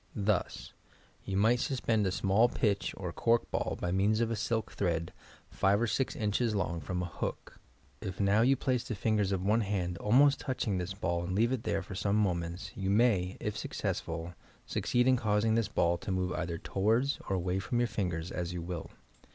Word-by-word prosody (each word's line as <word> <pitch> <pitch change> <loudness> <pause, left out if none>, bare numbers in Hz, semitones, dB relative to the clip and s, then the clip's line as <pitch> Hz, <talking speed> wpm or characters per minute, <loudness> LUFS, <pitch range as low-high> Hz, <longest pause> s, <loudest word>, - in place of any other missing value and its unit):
Thus: 100 -3 -1 0.5
You 95 - -2
might 115 +4 +4
suspend 115 -6 0
a - - 0
small 100 +5 +3
pith 100 -6 0
or - - -5
cork 115 0 +1
ball - - -1
by 90 - -1
means 100 +4 +2
of 115 -1 +1
a - - 0
silk 110 -1 -1
thread, 85 -4 -1 0.4
five 100 +1 +2
or 120 - +2
six 130 +3 -1
inches 110 0 0
long, 85 -4 -1
from 90 +5 -3
a - - -2
hook. 85 - -5 0.4
If 95 -2 -5
now 100 +2 +3
yon 130 +4 +5
place 130 -2 0
the 120 - -4
fingers 105 -1 +1
of 95 -1 -1
one 110 +3 +3
hand 90 -4 -2
almost 135 +7 +4
touching 125 -8 -1
this 90 +2 -4
ball 85 -3 -1
and 90 +1 -3
leave 115 +4 +3
it 130 -4 -2
there 95 - 0
for 95 - -9
some 100 +1 0
moments, 90 -3 -1
you 95 -1 -2
may, 100 -4 +2
if 105 - -3
success - - -2
ful, 85 +1 -6 0.3
succeed 125 +1 +1
in 130 -1 +5
causing 110 0 +1
this 115 -2 +2
ball 85 -4 +1
to 100 - -4
move 90 -1 0
either 85 -1 -3
towards 110 - +1
or 95 - +1
away 90 +1 -1
from 120 +6 -2
your 120 0 +2
fingers 90 -5 -3
as 90 0 -3
you 90 - -4
will. 85 -1 -5
100 Hz, 205 wpm, -31 LUFS, 90-115 Hz, 0.5 s, yon